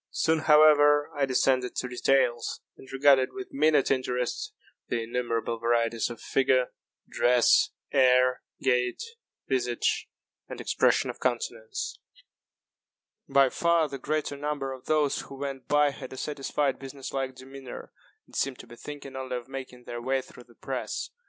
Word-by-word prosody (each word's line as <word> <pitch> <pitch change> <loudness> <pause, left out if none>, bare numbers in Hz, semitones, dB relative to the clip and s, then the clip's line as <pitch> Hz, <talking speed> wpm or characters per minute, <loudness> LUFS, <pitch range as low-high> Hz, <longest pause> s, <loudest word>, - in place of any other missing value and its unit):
Soon, 160 0 +1
however, 150 -1 +5
I 145 -2 0
descended 130 -1 +1
to - - -2
details, 125 -1 +1 0.2
and 130 - -14
regarded 135 -1 +4
with 195 -1 -8
minute 150 0 +3
interest 125 -2 -1 0.4
the 115 -1 -1
innumerable 115 -1 -2
varieties 115 0 +1
of 120 - -8
figure, 130 -1 +1 0.4
dress, 125 0 +4 0.2
air, 125 -1 +4 0.2
gait, 125 -1 +1 0.5
visage, 125 -3 0 0.4
and - - -7
expression - - +2
of - - -17
countenance. 460 -4 -3 1.3
By 135 -1 +5
far 170 +2 +2
the 140 -1 -7
greater 150 +1 -2
number 145 -2 -3
of 130 - -12
those 150 -2 +1
who 135 - -9
went 135 -1 -5
by 145 0 +3
had 130 -1 -9
a - - -9
satisfied 145 0 -1
business 135 0 -8
like 135 -1 -2
demeanor, 130 0 -10 0.3
and - - -17
seemed 135 -2 -1
to - - -11
be 120 - -13
thinking 140 -1 -9
only 130 -1 -4
of 120 - -9
making 130 -2 -8
their 120 0 -6
way 130 +1 0
through 125 - -15
the 120 - -21
press. - - -4
135 Hz, 150 wpm, -27 LUFS, 125-145 Hz, 1.3 s, however